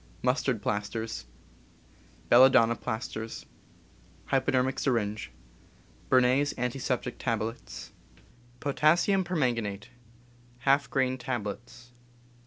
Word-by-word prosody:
Mustard 125 Hz, -3 st, 0 dB
plasters. 105 Hz, -, -3 dB, 1.0 s
Belladonna 120 Hz, -2 st, +6 dB
plasters. 110 Hz, -1 st, -5 dB, 0.8 s
Hypodermic 130 Hz, 0 st, +1 dB
sjTinge. 110 Hz, -5 st, -1 dB, 0.8 s
Bernays' 130 Hz, +3 st, +3 dB
antiseptic 125 Hz, 0 st, -2 dB
tablets. 115 Hz, +1 st, -4 dB, 0.3 s
* 120 Hz, +2 st, -29 dB
Potassium 170 Hz, +7 st, +3 dB
permanganate, 120 Hz, -, -1 dB, 0.8 s
^ 140 Hz, +1 st, +3 dB
grain 130 Hz, -1 st, 0 dB
tablets. 120 Hz, 0 st, -5 dB
125 Hz, 70 wpm, -28 LUFS, 115-135 Hz, 1.0 s, Belladonna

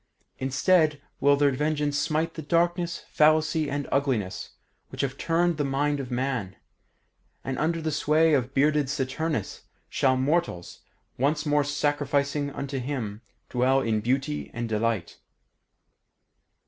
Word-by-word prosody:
Instead 150 Hz, +3 st, +2 dB, 0.2 s
will 140 Hz, +1 st, +5 dB
their 140 Hz, 0 st, +3 dB
vengeance 150 Hz, +1 st, 0 dB
smite 155 Hz, +2 st, 0 dB
the 160 Hz, -, -6 dB
darkness, 170 Hz, +3 st, 0 dB
fallacy 155 Hz, 0 st, +3 dB
and 145 Hz, 0 st, -3 dB
ugliness 130 Hz, -9 st, -1 dB, 0.3 s
which -, -, -4 dB
have 135 Hz, -1 st, -2 dB
turned 170 Hz, +2 st, +1 dB
the 150 Hz, -, 0 dB
mind 145 Hz, +1 st, 0 dB
of 130 Hz, -3 st, -5 dB
man; 125 Hz, -7 st, -2 dB, 0.9 s
and 135 Hz, 0 st, -3 dB
under 165 Hz, +2 st, 0 dB
the 160 Hz, -1 st, -2 dB
sway 155 Hz, +2 st, +3 dB
of 130 Hz, -2 st, +1 dB
bearded 145 Hz, 0 st, +2 dB
Saturnus 140 Hz, -, -2 dB, 0.3 s
shall 130 Hz, -1 st, +2 dB
mortals, 135 Hz, -, -1 dB, 0.4 s
once 150 Hz, +3 st, +1 dB
more 145 Hz, -1 st, +3 dB
sacrificing 145 Hz, 0 st, 0 dB
unto 140 Hz, -1 st, -4 dB
him, 120 Hz, -6 st, -4 dB, 0.3 s
dwell 130 Hz, +2 st, +2 dB
in 110 Hz, -3 st, 0 dB
beauty 135 Hz, +6 st, -1 dB
and 120 Hz, 0 st, -2 dB
delight. 110 Hz, -4 st, -1 dB
145 Hz, 130 wpm, -26 LUFS, 130-155 Hz, 0.9 s, will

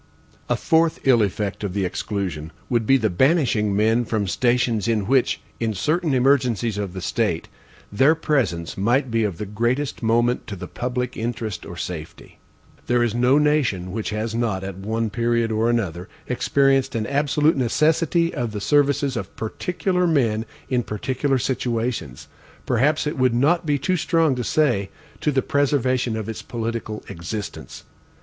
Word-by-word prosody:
A -, -, +3 dB
fourth 165 Hz, -1 st, +2 dB
ill 125 Hz, -4 st, +5 dB
effect 100 Hz, 0 st, -2 dB
of 100 Hz, -3 st, -3 dB
the 100 Hz, -2 st, 0 dB
exclusion 90 Hz, -5 st, -3 dB, 0.2 s
would 115 Hz, -3 st, +1 dB
be 135 Hz, -, +6 dB
the 110 Hz, -4 st, +1 dB
banishing 115 Hz, -, +2 dB
men 110 Hz, +3 st, +3 dB
from 110 Hz, -3 st, -1 dB
stations 120 Hz, +1 st, +1 dB
in 110 Hz, -4 st, +1 dB
which, 130 Hz, +3 st, +2 dB, 0.2 s
in 110 Hz, -2 st, -1 dB
certain 155 Hz, -, 0 dB
emergencies 125 Hz, -5 st, +2 dB
of 100 Hz, -3 st, -4 dB
the 95 Hz, -, -6 dB
state, -, -, -1 dB, 0.4 s
their 135 Hz, +10 st, +4 dB
presence 120 Hz, -, -1 dB
might 120 Hz, +6 st, +1 dB
be 115 Hz, 0 st, +2 dB
of 100 Hz, -6 st, -2 dB
the 105 Hz, -, -4 dB
greatest 120 Hz, +7 st, -1 dB
moment 120 Hz, +2 st, +1 dB
to 105 Hz, -, -5 dB
the 90 Hz, -, -7 dB
public 125 Hz, 0 st, -3 dB
interest 110 Hz, -5 st, -4 dB
or 85 Hz, -, -8 dB
safety. 80 Hz, -3 st, -7 dB, 0.5 s
There 120 Hz, 0 st, +3 dB
is 120 Hz, -3 st, 0 dB
no 125 Hz, +3 st, +3 dB
nation 140 Hz, -12 st, +1 dB
which 110 Hz, +2 st, -3 dB
has 110 Hz, +1 st, -3 dB
not, 110 Hz, -5 st, -1 dB
at 95 Hz, -1 st, -5 dB
one 110 Hz, +3 st, -2 dB
period 115 Hz, 0 st, 0 dB
or 110 Hz, +2 st, +1 dB
another, 95 Hz, -6 st, -2 dB, 0.2 s
experienced 135 Hz, +1 st, +2 dB
an 110 Hz, -2 st, -1 dB
absolute 150 Hz, +4 st, +2 dB
necessity 160 Hz, +6 st, +2 dB
of 120 Hz, -3 st, -3 dB
the 105 Hz, -, -3 dB
services 140 Hz, 0 st, +2 dB
of 115 Hz, -, -5 dB
particular 180 Hz, -, -1 dB
men 115 Hz, -8 st, +1 dB, 0.2 s
in 125 Hz, -2 st, +1 dB
particular 130 Hz, +5 st, -1 dB
situations; 120 Hz, -, -2 dB, 0.4 s
perhaps 130 Hz, +7 st, +2 dB
it 150 Hz, -2 st, -3 dB
would 130 Hz, -2 st, +3 dB
not 155 Hz, +7 st, +2 dB
be 145 Hz, -1 st, +2 dB
too 185 Hz, +7 st, 0 dB
strong 165 Hz, -3 st, +2 dB
to 125 Hz, -1 st, -3 dB
say, 120 Hz, -10 st, +1 dB, 0.3 s
to 150 Hz, -, +1 dB
the 130 Hz, -2 st, +1 dB
preservation 130 Hz, -5 st, +1 dB
of 110 Hz, -, -4 dB
its 115 Hz, -, -5 dB
political 115 Hz, -2 st, -4 dB
existence. 95 Hz, +5 st, -6 dB
120 Hz, 165 wpm, -22 LUFS, 105-135 Hz, 0.5 s, be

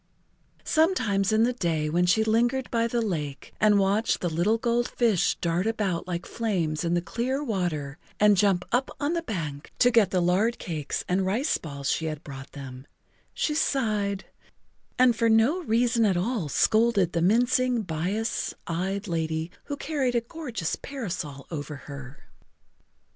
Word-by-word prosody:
Sometimes 220 Hz, -, +2 dB
in 220 Hz, +1 st, +4 dB
the 245 Hz, +2 st, +2 dB
day 165 Hz, -9 st, -1 dB
when 175 Hz, +3 st, +1 dB
she 220 Hz, +5 st, +4 dB
lingered 240 Hz, +4 st, +1 dB
by 230 Hz, -1 st, +2 dB
the 235 Hz, 0 st, 0 dB
lake 150 Hz, -9 st, -4 dB
and 210 Hz, -1 st, +5 dB
watched 200 Hz, +3 st, +2 dB
the 175 Hz, -, -2 dB
little 180 Hz, +8 st, +2 dB
gold 235 Hz, +1 st, +1 dB
fish 225 Hz, -7 st, +1 dB
dart 170 Hz, +4 st, 0 dB
about 200 Hz, -6 st, -1 dB
like 175 Hz, -1 st, -3 dB
flames 180 Hz, -9 st, -1 dB
in 170 Hz, 0 st, +1 dB
the 175 Hz, -, 0 dB
clear 260 Hz, +8 st, -2 dB
water 175 Hz, -, -2 dB, 0.2 s
and 210 Hz, 0 st, +6 dB
jump 190 Hz, -2 st, +2 dB
up 245 Hz, +3 st, +1 dB
on 290 Hz, +3 st, 0 dB
the 340 Hz, -, 0 dB
bank 155 Hz, -, -5 dB
to 245 Hz, -, +5 dB
get 225 Hz, -5 st, +4 dB
the 185 Hz, -, +1 dB
lard 190 Hz, +7 st, +2 dB
cakes 155 Hz, -5 st, -4 dB
and 185 Hz, +1 st, +1 dB
rice 240 Hz, +11 st, +1 dB
balls 140 Hz, -3 st, -3 dB
she 160 Hz, -, -1 dB
had 155 Hz, 0 st, -4 dB
brought 135 Hz, -1 st, -9 dB
them, 130 Hz, -1 st, -9 dB, 0.4 s
she 300 Hz, -, -1 dB
sighed, 215 Hz, -10 st, 0 dB, 0.7 s
and 250 Hz, -2 st, +5 dB
for 230 Hz, 0 st, +2 dB
no 225 Hz, +11 st, +4 dB
reason 235 Hz, 0 st, +2 dB
at 195 Hz, -4 st, +3 dB
all 190 Hz, -, -1 dB
scolded 215 Hz, -1 st, +3 dB
the 170 Hz, -, 0 dB
mincing, 245 Hz, +4 st, +2 dB
bias 185 Hz, +7 st, -2 dB
eyed 190 Hz, +5 st, -2 dB
lady 160 Hz, -1 st, -2 dB
who 285 Hz, -, -4 dB
carried 275 Hz, -5 st, -1 dB
a 235 Hz, -, +3 dB
gorgeous 235 Hz, -, -4 dB
parasol 175 Hz, -, -5 dB
over 150 Hz, -2 st, -5 dB
her. 135 Hz, 0 st, -10 dB
200 Hz, 165 wpm, -26 LUFS, 165-235 Hz, 0.7 s, and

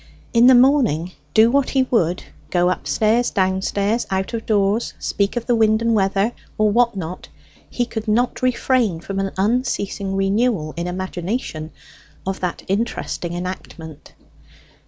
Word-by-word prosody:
In 235 Hz, +1 st, +6 dB
the 260 Hz, -, +8 dB
morning, 245 Hz, -, +3 dB, 0.2 s
do 225 Hz, +2 st, +6 dB
what 280 Hz, 0 st, +2 dB
he 265 Hz, -1 st, +2 dB
would 180 Hz, -6 st, +1 dB, 0.3 s
go 180 Hz, 0 st, +2 dB
upstairs, 220 Hz, +5 st, +1 dB
downstairs, 200 Hz, +3 st, 0 dB
out 190 Hz, +3 st, -2 dB
of 225 Hz, -1 st, -4 dB
doors, 205 Hz, +1 st, +1 dB
speak 200 Hz, +2 st, -1 dB
of 235 Hz, -, -2 dB
the 245 Hz, -, +2 dB
wind 220 Hz, -1 st, +3 dB
and 230 Hz, 0 st, +1 dB
weather, 195 Hz, +1 st, +1 dB, 0.3 s
or 215 Hz, -1 st, +3 dB
what 235 Hz, -1 st, +2 dB
not 180 Hz, 0 st, -6 dB, 0.4 s
he 245 Hz, -, -1 dB
could 225 Hz, -2 st, -6 dB
not 240 Hz, +3 st, +1 dB
refrain 250 Hz, -7 st, +1 dB
from 195 Hz, +3 st, -5 dB
an 195 Hz, 0 st, -1 dB
unceasing 200 Hz, -2 st, -1 dB
renewal, 195 Hz, -4 st, 0 dB
in 170 Hz, +2 st, -3 dB
imagination, 180 Hz, -2 st, -4 dB, 0.6 s
of 190 Hz, 0 st, -3 dB
that 180 Hz, -2 st, -3 dB
interesting 195 Hz, -4 st, -2 dB
enactment. 175 Hz, -3 st, -7 dB
205 Hz, 145 wpm, -20 LUFS, 185-235 Hz, 0.6 s, the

